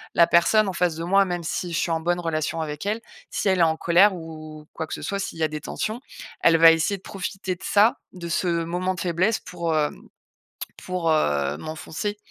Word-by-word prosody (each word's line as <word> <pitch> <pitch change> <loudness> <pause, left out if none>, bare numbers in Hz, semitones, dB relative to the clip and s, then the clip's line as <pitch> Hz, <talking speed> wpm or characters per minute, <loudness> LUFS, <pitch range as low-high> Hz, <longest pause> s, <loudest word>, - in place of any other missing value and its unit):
La 170 - +7
personne 200 +5 +4
en 190 - -4
face 175 -2 0
de 165 - -5
moi, 195 +3 +4
même 175 -2 -3
si 170 +2 -3
je - - 0
suis 170 - 0
en 165 - +1
bonne 175 +2 0
relation 165 -1 -2
avec 150 +3 -5
elle, 215 +3 -1 0.3
si 200 - -1
elle 190 -1 +2
est - - +4
en 160 -1 +2
colère 185 +4 +5
ou 160 -2 -8 0.2
ou - - -19
quoi 160 -1 -4
que - - -6
ce - - -5
soit, 200 - -3
s'il 195 - -5
y - - 0
a - - +4
des 150 0 -5
tensions, 220 +3 -4 0.4
elle 165 -1 +5
va 165 0 +9
essayer 165 +5 +1
de 190 - -20
profiter 190 -1 -4
de - - -16
ça. 210 +3 +4 0.2
De 170 -2 -7
ce 180 - 0 0.2
moment 180 +2 -2
de - - -8
faiblesse 185 +5 +1
pour 170 -3 -3
hem 150 -1 -1 0.8
pour, 175 -3 -1
heu, 75 - +1
m'enfoncer. 160 - -5
170 Hz, 235 wpm, -24 LUFS, 160-190 Hz, 0.8 s, va